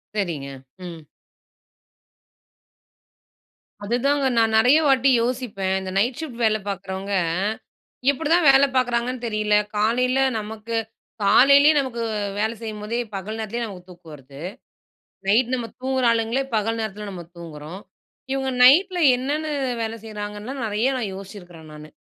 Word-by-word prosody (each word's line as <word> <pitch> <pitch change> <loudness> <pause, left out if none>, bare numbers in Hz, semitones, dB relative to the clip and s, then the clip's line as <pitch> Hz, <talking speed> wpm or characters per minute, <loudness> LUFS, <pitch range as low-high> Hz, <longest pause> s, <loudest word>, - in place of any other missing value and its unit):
சரிங்க. 170 -9 -2 0.4
ம். 170 -2 -8 2.8
அதுதாங்க 270 +6 +1
நான் 225 -1 +3
நெறைய 250 +7 +5
வாட்டி 270 -1 +4
யோசிப்பேன். 230 -6 -2
இந்த 190 -1 -6
நைட் 240 +5 +1
ஷிஃப்ட் 250 -7 -7
வேல 215 -1 +3
பார்க்குறவங்க, 195 0 -5 1.0
எப்டிதான் 320 +4 +1
வேல 270 +1 +5
பார்க்குறாங்கன்னு 245 0 0
தெரியல. 215 -1 +1 0.2
காலையில 250 +5 +2 0.2
நமக்கு 220 +2 -6 0.5
காலையிலயே 280 +8 +6
நமக்கு 245 -4 -3 0.4
வேலை 220 +2 0
செய்யும்போதே, 215 +1 -4 0.2
பகல் 205 +3 -5
நேரத்திலயே 225 +2 -3
நமக்கு 185 -4 -10
தூக்கம் 175 -3 -13
வருது. 135 0 -13 0.9
நைட் 235 +5 +3
நம்ம 240 -2 -4
தூங்குற 260 -1 0
ஆளுங்களே 230 +3 0
பகல் 225 +2 0
நேரத்துல 210 -1 -5
நம்ம 180 -2 -8
தூங்குறோம். 165 +1 -9 0.5
இவுங்க 265 -1 -1
நைட்ல 355 +8 +6 0.2
என்னென்னு 300 +4 -2 0.3
வேல 225 0 -4
செய்கிறாங்கன்னுலாம் 210 +4 -6
நெறைய 215 +4 0
நான் 220 -6 -3
யோசிச்சிருக்கேன் 180 -5 -11
நானு. 150 0 -12
220 Hz, 120 wpm, -23 LUFS, 195-255 Hz, 2.8 s, காலையிலயே